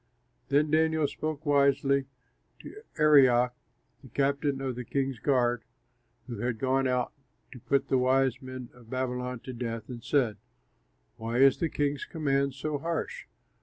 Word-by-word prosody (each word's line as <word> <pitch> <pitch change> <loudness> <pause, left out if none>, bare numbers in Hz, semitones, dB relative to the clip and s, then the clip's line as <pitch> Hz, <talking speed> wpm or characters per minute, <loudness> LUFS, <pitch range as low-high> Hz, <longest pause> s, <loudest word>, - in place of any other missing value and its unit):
Then 145 +2 +2
Daniel 160 -1 +3
spoke 155 +1 -5
wisely, 140 -1 +3 0.6
to 430 - -10 0.2
Arioch, 130 -5 +5 0.5
the 135 - -13
captain 140 +2 0
of 135 -1 -2
the 125 - -5
king's 135 -1 -2
guard, 120 -3 +1 0.6
who 120 -4 -7
had 120 0 -1
gone 135 +2 +1
out 125 -1 0 0.4
to 125 - -10
put 140 +4 0
the 130 - +2
wise 130 0 +2
men 130 -2 -8
of 120 -2 -18
Babylon 125 -1 -3
to 130 - -7
death, 115 -1 -5
and 120 -2 -8
said, 125 -7 +1 0.8
"Why 115 +1 -3
is 135 0 +6
the 165 - 0
king's 145 -1 -1
command 140 -3 0
so 145 +1 -3
harsh?" 170 - -4
135 Hz, 150 wpm, -28 LUFS, 125-145 Hz, 0.8 s, is